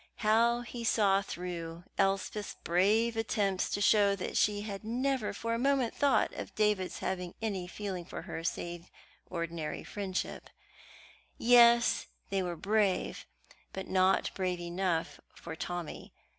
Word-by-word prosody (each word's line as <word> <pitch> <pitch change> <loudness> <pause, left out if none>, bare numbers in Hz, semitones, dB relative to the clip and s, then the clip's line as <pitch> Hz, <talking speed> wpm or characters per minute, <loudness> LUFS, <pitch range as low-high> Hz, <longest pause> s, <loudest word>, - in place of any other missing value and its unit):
How 235 +2 +4
he 240 0 -7
saw 200 -3 +3
through 170 -3 -6
Elspeth's 195 +2 0
brave 210 +7 +3
attempts 205 -4 0
to 205 - -2
show 200 -1 +5
that 185 - -5
she 205 -1 +2
had 205 -1 -6
never 250 +1 0
for 230 +3 -3
a 230 - -1
moment 270 -2 +2
thought 285 -2 +2
of - - -7
David's 210 -3 +1
having 180 -2 -3
any 200 -5 -2
feeling 190 -2 -5
for - - -7
her 165 - -6
save 175 0 -4 0.4
ordinary 170 -3 -4
friendship 195 -3 -4 0.9
yes, 235 0 +5 0.2
they 195 -1 +1
were 175 -2 -3
brave, 205 0 0 0.5
but 190 0 -5
not 185 0 +3
brave 180 -2 -1
enough 175 -1 -2 0.2
for 165 -1 -8
Tommy. 175 -1 -5
195 Hz, 135 wpm, -31 LUFS, 180-225 Hz, 0.9 s, show